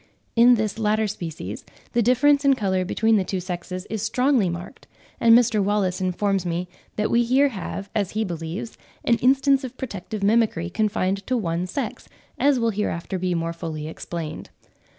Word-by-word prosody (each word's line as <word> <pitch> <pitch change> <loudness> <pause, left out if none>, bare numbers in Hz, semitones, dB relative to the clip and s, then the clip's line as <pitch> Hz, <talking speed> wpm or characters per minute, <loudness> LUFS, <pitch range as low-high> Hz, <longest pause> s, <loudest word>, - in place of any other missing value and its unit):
In 240 +1 +7
this 215 -1 -2
latter 215 0 +2
species 165 - -6 0.3
the 240 - +3
difference 275 +5 +4
in 275 -1 +5
colour 190 -5 0
between 220 +4 +2
the 195 - +1
two 185 0 -3
sexes 180 +1 -5
is 220 -1 -4
strongly 245 -1 +2
marked; 170 +1 -8 0.3
and 230 0 +7
Mr. 225 -4 +2
Wallace 195 -2 0
informs 190 +1 0
me 175 +1 -2 0.3
that 215 - 0
we 235 - +4
here 260 +4 +3
have, 195 -2 -6
as 205 -4 -1
he 220 - +2
believes, 170 +3 -5 0.3
an 235 - +4
instance 270 +3 +3
of 260 0 -7
protective 210 -3 -5
mimicry 205 -5 +2
confined 200 -2 0
to 255 - +1
one 175 -4 -1
sex, 230 +3 -5 0.3
as 280 -2 +3
will 230 -1 +1
hereafter 190 -3 -3
be 180 -1 0
more 165 0 -2
fully 160 -3 -5
explained. 160 0 -6
210 Hz, 170 wpm, -23 LUFS, 180-235 Hz, 0.3 s, In